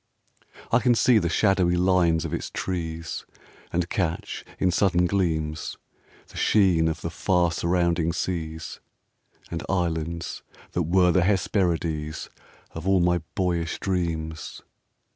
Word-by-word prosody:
I 115 - +5
can 125 0 +3
see 115 -1 +5
the 85 - -1
shadowy 95 -1 +3
lines 90 -3 +3
of - - -4
its - - -3
trees, 80 -3 -4 0.5
And 85 0 0
catch, 85 -2 -2
in 90 - +2
sudden 90 -1 +3
gleams, 80 -5 -1 0.5
The - - -12
sheen 90 -6 +4
of 80 - -2
the - - -4
far 90 -2 +2
surrounding 85 -1 +1
seas, 80 -2 -4 0.7
And 85 - -3
islands 85 -3 -2 0.3
that 90 -3 -1
were 90 0 +5
the 90 - +3
Hesperides 85 -5 0 0.4
Of 80 +3 -6
all 95 -1 +4
my 90 0 +3 0.2
boyish 85 -3 -1
dreams. 80 -4 -3
85 Hz, 125 wpm, -25 LUFS, 80-95 Hz, 0.7 s, I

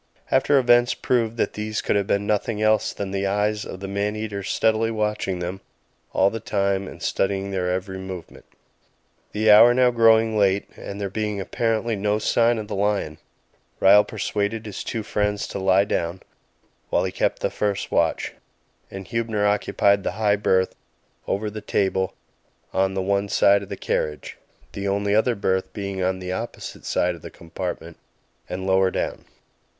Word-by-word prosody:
After 145 - +4
events 120 -1 +4
proved 115 -2 0
that - - 0
these 105 0 -3
could - - 0
have 100 -1 +1
been 100 +1 +1
nothing 105 +1 -1
else 110 0 +2
than 100 -1 -5
the 100 0 -1
eyes 105 +1 0
of 95 - -8
the 100 - -4
man 100 +2 -1
eater 105 -2 -4
steadily 110 +3 +1
watching 105 -4 -1
them 90 +2 -5 0.5
all 95 +1 +3
the 115 - -4
time 100 -2 -1
and - - -10
studying 100 0 -1
their 90 -2 -1
every 95 +1 -3
movement. 95 -2 -9 0.9
The 110 0 +3
hour 120 +4 +8
now 125 -1 +4
growing 115 -1 +4
late, 100 0 +2
and 100 - -8
there 100 - -2
being 105 -1 -2
apparently 115 +3 -1
no 105 +1 0
sign 115 +2 +2
of 110 -1 -5
the - - -5
lion, 100 -6 -1 0.6
Ryall 100 +2 +7
persuaded 105 0 -2
his 105 -3 -6
two 110 - -3
friends 105 -1 -1
to - - -4
lie 95 +1 +3
down, 85 -2 -2 0.7
while - - +2
he - - -2
kept - - -1
the - - +1
first 100 -2 -2
watch. - - +1 0.6
Huebner 105 +2 -2
occupied 100 -1 +2
the - - -2
high 105 -1 +2
berth 95 -2 +1 0.5
over 105 +2 -1
the 110 +1 -7
table 95 -2 0 0.6
on 95 0 +1
the 95 - -1
one 100 +1 0
side 100 0 +4
of 100 - -9
the - - -5
carriage, 75 -1 -3 0.3
the 100 0 -4
only 100 +1 0
other 115 +3 +3
berth 95 -2 -1
being 100 -2 -4
on 95 0 0
the 90 0 -5
opposite 115 +6 -6
side 90 0 +1
of 85 - -12
the - - -8
compartment 85 0 -6 0.5
and 95 +1 -4
lower 95 0 +3
down. - - -3
100 Hz, 175 wpm, -23 LUFS, 95-110 Hz, 0.9 s, hour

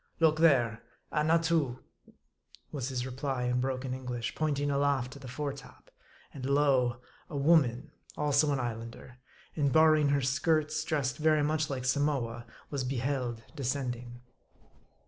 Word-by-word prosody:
" - - -38
Look 160 -1 +4
there: 120 -9 +4 0.3
Annatoo! 160 -4 +2 0.9
was 135 -3 -3
his 125 -2 -2
reply 130 0 -3
in 125 0 +1
broken 130 0 -2
En 130 0 -6
glish, 120 -2 -3
pointing 145 -2 0
aloft 140 -2 +1
to 140 - -11
the 135 - -10
fore 140 +3 -3
top. 140 - -14 0.4
And 135 - -8
lo! 130 -3 +2 0.3
a 145 - -4
woman, 140 -3 +3 0.3
also 145 0 +3
an 140 - 0
Islander; 115 +1 -6 0.4
and 145 -3 +1
barring 155 -1 +5
her 140 0 +2
skirts, 155 +3 +1
dressed 145 -5 -1
very 155 -1 +3
much 155 +1 0
like 130 -2 -3
Samoa, 130 -4 0 0.2
was 140 -3 -2
beheld 125 -2 -2
descending. 125 -3 -3
140 Hz, 145 wpm, -30 LUFS, 125-150 Hz, 0.9 s, barring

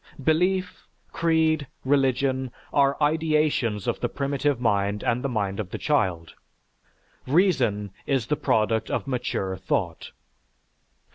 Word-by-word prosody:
Belief, 180 +5 0 0.2
creed, 160 -3 +1 0.2
religion, 130 -1 +1 0.2
are 140 -1 +3
ideations 150 - +1
of - - -1
the - - -1
primitive 140 -1 -1
mind 100 -3 0
and 120 +2 0
the 140 - -1
mind 100 -4 -2
of 100 -4 -4
the - - -5
child; 90 - 0 0.9
reason 130 - +2 0.2
is 135 -5 +1
the 150 - 0
product 110 -6 +1
of - - -2
mature 120 -7 -2
thought. 85 -2 -2
130 Hz, 120 wpm, -25 LUFS, 105-150 Hz, 0.9 s, are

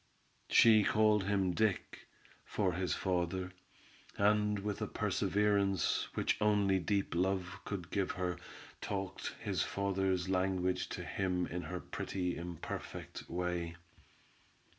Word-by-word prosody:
She 110 -2 +7
called 105 -1 +3
him 95 -2 +2
Dick, 105 +1 -1 0.4
for 95 -4 0
his 90 +1 0
father, 90 0 -1 0.7
and 105 0 +3
with 100 0 -3
a - - 0
perseverance 100 -3 +1
which - - 0
only 100 -2 +3
deep 100 +2 0
love 90 +1 0
could 90 -4 -5
give 100 -2 0
her, 90 -1 -2 0.4
talked 95 -2 -4
his - - -1
father's 95 -2 0
language 95 -1 0
to - - -5
him 90 -2 -1
in 90 +1 -4
her 90 0 -5
pretty, 90 -1 -3
imperfect 85 -1 -6
way. 85 -1 -2
95 Hz, 120 wpm, -34 LUFS, 90-100 Hz, 0.7 s, She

